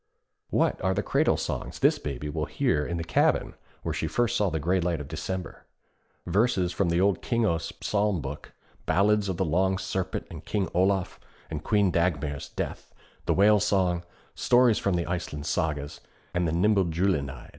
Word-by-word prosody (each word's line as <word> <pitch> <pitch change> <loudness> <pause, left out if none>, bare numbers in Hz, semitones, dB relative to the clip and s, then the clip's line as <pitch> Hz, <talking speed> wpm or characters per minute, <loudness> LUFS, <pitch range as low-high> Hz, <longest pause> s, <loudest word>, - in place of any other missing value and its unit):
What - - +1
are 95 0 +1
the - - 0
cradle - - +2
songs - - -4
this - - +3
Baby 70 0 -5
will 75 - -2
hear 75 -1 +1
in 85 +3 -3
the 85 - -3
cabin 80 - +1 0.3
where - - -2
she - - -2
first 120 -3 0
saw 105 -2 +2
the 80 - -2
gray 90 +5 +1
light 85 -2 0
of 75 - -7
December? 85 +4 -5 0.6
Verses 95 -1 +2
from 90 0 0
the 85 +1 +2
old 95 -1 +2
Kingos 110 -9 0
Psalm 105 -3 +1
book, 75 0 -7 0.4
ballads 105 +1 +3
of 90 - -2
the 95 - +1
Long 95 +4 +1
Serpent 95 -1 -3
and - - -8
King 100 -3 -1
Olaf, 95 +1 +1 0.3
of 75 -1 -4
Queen 105 -4 +2
Dagmar's 75 -5 -1
death, - - -5 0.4
the - - +2
Whale 105 +2 +5
Song, 95 -4 +1 0.3
stories 120 -3 +4
from 100 -2 0
the 85 -1 0
Iceland 80 -4 -4
Sagas 75 -3 -2 0.3
and 90 -1 +1
the - - 0
Nibelungenlied. 90 -5 +1
90 Hz, 175 wpm, -27 LUFS, 80-100 Hz, 0.6 s, Whale